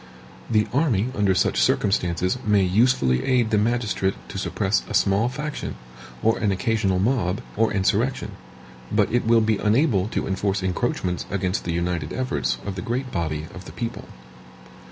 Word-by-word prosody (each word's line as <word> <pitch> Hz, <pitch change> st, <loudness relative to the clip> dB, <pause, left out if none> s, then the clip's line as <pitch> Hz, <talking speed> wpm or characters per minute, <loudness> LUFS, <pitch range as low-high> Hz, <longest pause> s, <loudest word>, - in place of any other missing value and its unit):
The 105 Hz, -2 st, +3 dB
army 125 Hz, -6 st, +2 dB
under 100 Hz, -2 st, +2 dB
such -, -, +2 dB
circumstances 90 Hz, -2 st, +1 dB
may 105 Hz, -2 st, +3 dB
usefully 90 Hz, -, +2 dB
aid 125 Hz, -4 st, +2 dB
the 105 Hz, -, +3 dB
magistrate 105 Hz, -4 st, 0 dB
to -, -, -5 dB
suppress 95 Hz, 0 st, 0 dB
a -, -, -2 dB
small 100 Hz, +4 st, +3 dB
faction, 150 Hz, +3 st, -5 dB, 0.5 s
or 115 Hz, +1 st, +3 dB
an 105 Hz, -, +1 dB
occasional 95 Hz, 0 st, +1 dB
mob, 100 Hz, -2 st, +1 dB, 0.2 s
or 110 Hz, +1 st, +2 dB
insurrection; 95 Hz, -2 st, 0 dB, 0.6 s
but -, -, +1 dB
it 120 Hz, -2 st, +1 dB
will 115 Hz, 0 st, +5 dB
be 110 Hz, -1 st, +1 dB
unable 105 Hz, -, +2 dB
to 115 Hz, -, -2 dB
enforce 95 Hz, 0 st, -1 dB
encroachments 90 Hz, -2 st, -1 dB
against 95 Hz, -1 st, -1 dB
the 85 Hz, -, -1 dB
united 85 Hz, -2 st, -2 dB
efforts 75 Hz, -, -1 dB
of 100 Hz, -, -3 dB
the 95 Hz, -, -5 dB
great 125 Hz, +2 st, -3 dB
body 80 Hz, -3 st, -2 dB
of 90 Hz, -1 st, -10 dB
the -, -, -9 dB
people. 115 Hz, -1 st, -5 dB
100 Hz, 160 wpm, -23 LUFS, 95-115 Hz, 0.6 s, will